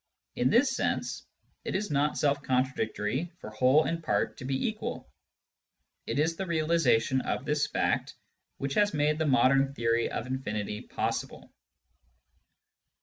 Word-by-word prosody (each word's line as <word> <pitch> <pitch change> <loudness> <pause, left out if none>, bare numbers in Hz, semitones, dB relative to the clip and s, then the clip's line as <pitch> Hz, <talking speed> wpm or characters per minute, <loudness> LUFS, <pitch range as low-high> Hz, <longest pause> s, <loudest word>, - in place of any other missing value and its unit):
In 125 - +2
this 255 - +3
sense, - - -2 0.4
it - - -3
is 205 -1 -2
not 145 +1 +1
self 145 -1 +1
contradictory 130 - -1
for 105 - -9
whole 130 +7 +4
and 165 0 -2
part - - 0
to 130 - -8
be 135 - 0
equal; 215 -1 -5 1.0
it - - -2
is 160 +3 +2
the 190 - -3
realisation 155 -7 +2
of 130 - -3
this 150 0 +1
fact - - -1 0.4
which 140 0 -3
has 205 -1 +2
made 150 +1 +1
the 160 - +1
modern 135 +1 +3
theory 115 -1 +1
of - - -4
infinity 105 -5 -3
possible. - - -4
140 Hz, 145 wpm, -29 LUFS, 125-160 Hz, 1.0 s, whole